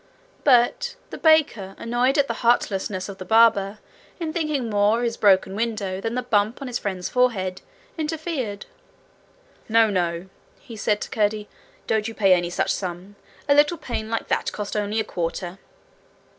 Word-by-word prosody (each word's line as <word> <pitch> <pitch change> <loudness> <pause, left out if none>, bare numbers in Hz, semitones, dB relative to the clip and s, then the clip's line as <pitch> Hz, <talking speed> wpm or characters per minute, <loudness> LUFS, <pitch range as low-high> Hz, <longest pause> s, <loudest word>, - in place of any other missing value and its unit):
But 280 - +3 0.2
the - - -6
baker, 290 - +3
annoyed 245 +4 +1
at 280 -1 +3
the 230 - -1
heartlessness 200 -5 +1
of 195 -1 -9
the - - -5
barber, 215 -1 +4 0.4
in 320 -2 -3
thinking 305 -7 -1
more 205 +1 +2
of 240 - -2
his 230 -1 -1
broken 195 -2 +3
window 205 -4 -2
than 225 +2 -3
the 250 - -1
bump 215 -1 +1
on 275 - -6
his 245 -1 -3
friend's 185 -3 -3
forehead, 195 -8 0 0.4
interfered. 300 -9 -3 1.0
'No, 225 -1 +4
no,' 175 -2 -1 0.3
he 235 -6 -11
said 210 0 0
to - - -5
Curdie; 210 -1 0 0.4
'don't 220 0 0
you 225 - -7
pay 195 -3 +5
any 175 -1 +1
such 175 - 0
sum. 185 +2 -6 0.3
A 285 - +5
little 295 +4 +4
pane 230 -8 -5
like 225 - -2
that - - 0
cost 210 0 -5
only 210 +1 -1
a - - +1
quarter.' 175 0 -4
220 Hz, 170 wpm, -23 LUFS, 195-245 Hz, 1.0 s, pay